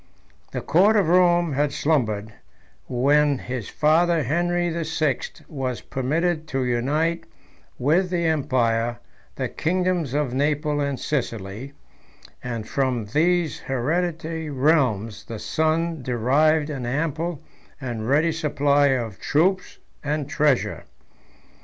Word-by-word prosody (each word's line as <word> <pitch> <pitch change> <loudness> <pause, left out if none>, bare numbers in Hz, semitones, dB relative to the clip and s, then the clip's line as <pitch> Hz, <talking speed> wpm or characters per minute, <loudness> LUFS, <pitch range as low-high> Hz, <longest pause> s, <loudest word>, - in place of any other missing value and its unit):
The - - -3
court 195 +8 +4
of 195 -6 +3
Rome 175 -2 +4
had 145 +1 +1
slumbered, 110 -9 0 0.5
when 140 +3 +3
his 125 -4 -5
father 165 +1 +3
Henry 175 +5 0
the 170 0 -2
Sixth 155 -4 -2
was 130 -5 -4
permitted 155 +5 -1
to 135 -4 -1
unite 150 +8 0 0.5
with 165 +8 +2
the 175 -2 0
empire 120 -7 +1 0.4
the - - -2
kingdoms 175 -4 -1
of 145 -4 0
Naples 145 +2 0
and 140 -2 -2
Sicily; 115 -2 -4 0.7
and 115 -3 -4
from 130 -5 -1
these 170 0 +2
hereditary 160 +4 -2
realms 125 -7 +1
the 115 - -6
son 160 +5 0
derived 145 +6 +2
an 130 -4 -4
ample 160 +4 -2 0.4
and 120 -4 -4
ready 155 +4 +3
supply 145 -2 +2
of 120 -7 -1
troops 185 +6 +1 0.3
and 150 -1 -2
treasure. 145 -2 +1
145 Hz, 115 wpm, -23 LUFS, 130-165 Hz, 0.7 s, court